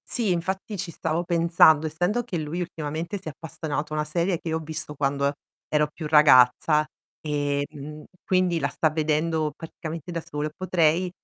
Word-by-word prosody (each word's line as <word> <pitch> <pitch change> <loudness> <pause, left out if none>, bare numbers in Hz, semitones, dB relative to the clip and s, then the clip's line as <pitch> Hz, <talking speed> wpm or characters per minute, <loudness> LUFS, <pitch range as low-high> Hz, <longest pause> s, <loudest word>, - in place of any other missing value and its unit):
Sì, 230 -6 0
infatti 190 +4 -2
ci 180 -1 -4
stavo 160 +1 -2
pensando. 165 -2 +4
Essendo 180 +10 0
che 220 -7 -4
lui 155 +2 -4
ultimamente 165 +2 -4
si 185 - -12
è - - -6
appassionato 155 -1 -5
a - - -1
una 150 - 0
serie 170 +3 0
che 165 - -5
io 160 - 0
ho - - -4
visto 155 -1 -5
quando 140 0 0
e 140 - -1 0.4
ero 150 0 +3
più 160 - -7
ragazza 150 0 +5 0.4
e, 145 -1 -1
mhmm, 150 +1 -9 0.2
quindi 185 -2 +2
la - - 0
sta 160 - +1
vedendo 155 0 0
praticamente 165 0 -7
da 170 -1 -3
solo, 150 0 -4
potrei, 180 -1 +2
160 Hz, 180 wpm, -25 LUFS, 150-170 Hz, 0.4 s, ragazza